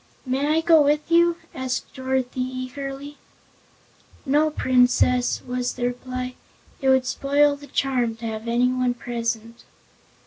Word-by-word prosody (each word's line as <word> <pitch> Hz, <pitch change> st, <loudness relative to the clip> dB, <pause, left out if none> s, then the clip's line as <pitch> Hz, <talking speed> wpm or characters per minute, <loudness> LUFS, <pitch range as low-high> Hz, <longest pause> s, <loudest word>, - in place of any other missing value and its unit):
"May 265 Hz, +3 st, 0 dB
I 315 Hz, +2 st, +2 dB
go 325 Hz, -1 st, +6 dB
with 295 Hz, +2 st, +1 dB
you?" 340 Hz, 0 st, +4 dB, 0.2 s
asked 260 Hz, -1 st, -4 dB
Dorothy, 260 Hz, -1 st, -2 dB
eagerly. 270 Hz, +3 st, -5 dB, 1.1 s
"No, 295 Hz, +3 st, +3 dB
Princess," 250 Hz, -3 st, +2 dB
was 250 Hz, 0 st, -2 dB
the 245 Hz, -, -3 dB
reply. 255 Hz, +1 st, -4 dB, 0.5 s
"It 265 Hz, -, +2 dB
would 260 Hz, -1 st, +4 dB
spoil 285 Hz, +2 st, +2 dB
the 285 Hz, 0 st, -13 dB
charm 255 Hz, -4 st, 0 dB
to 230 Hz, +1 st, -9 dB
have 220 Hz, 0 st, -5 dB
anyone 250 Hz, +1 st, +1 dB
present." 230 Hz, -1 st, -4 dB
255 Hz, 130 wpm, -23 LUFS, 245-285 Hz, 1.1 s, go